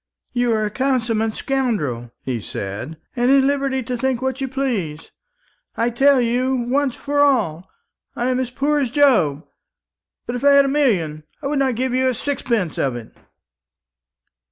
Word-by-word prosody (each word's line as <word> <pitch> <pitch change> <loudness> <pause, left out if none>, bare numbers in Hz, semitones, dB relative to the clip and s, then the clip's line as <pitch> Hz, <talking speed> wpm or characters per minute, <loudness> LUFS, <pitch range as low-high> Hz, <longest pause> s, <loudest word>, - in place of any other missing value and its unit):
"You 245 -1 +1
are 215 -1 +1
a 210 - -3
consummate 230 -4 0
scoundrel," 160 - -2
he 125 -4 -3
said, 105 +12 -6 0.2
"and 245 0 +2
are 275 - +6
at 270 - +4
liberty 275 -1 0
to 250 +2 -3
think 260 0 -1
what 265 +1 -3
you 270 - -1
please. 235 - -3 0.7
I 230 +1 +1
tell 270 +3 +4
you, 250 +2 +1
once 255 +2 0
for 290 0 -2
all, 215 - +2 0.5
I 245 +2 0
am 255 - 0
as 255 -2 -2
poor 285 +4 0
as 270 -4 0
Job. 220 - +3 0.8
But 240 - -4
if 245 - -5
I 285 0 +6
had 280 0 +6
a - - 0
million, 195 - +1 0.2
I - - -5
would 280 0 0
not 265 -3 +1
give 255 +2 -1
you 260 0 +2
a 255 - -1
sixpence 235 - -2
of 130 -3 0
it." 115 -2 -9
250 Hz, 180 wpm, -21 LUFS, 210-270 Hz, 0.8 s, are